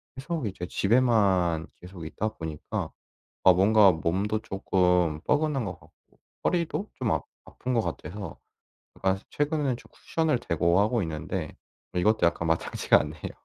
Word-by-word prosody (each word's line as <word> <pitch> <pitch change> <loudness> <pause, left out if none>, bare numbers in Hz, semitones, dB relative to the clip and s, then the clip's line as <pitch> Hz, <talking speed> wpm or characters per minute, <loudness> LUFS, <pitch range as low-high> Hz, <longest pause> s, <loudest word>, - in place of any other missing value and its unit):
계속 140 -1 -3
이제 90 -3 -5
집에만 100 -8 +2
계속 90 -3 -9
있다 110 +6 -2
보니까 80 -8 -5 0.6
아 95 - +9
뭔가 100 +1 +6
몸도 95 +7 -1
조금 90 -5 +1
뻐근한 150 -4 +1
것 100 - -3
같고 - - -25 0.3
허리도 175 +4 0
좀 125 -4 0
아 - - 0 0.2
아픈 130 - -5
것 120 - +3
같아서 100 -1 -6 0.6
약간 95 0 +1
최근에는 145 -3 0
좀 - - -17
쿠션을 160 -6 0
대고 85 -3 +2
하고 110 +3 +1
있는데 80 -4 -4 0.4
이것도 100 +2 +3
약간 85 0 -1
마땅치가 80 0 +3
않네요. - - -5
100 Hz, 300 characters per minute, -27 LUFS, 85-125 Hz, 0.6 s, 아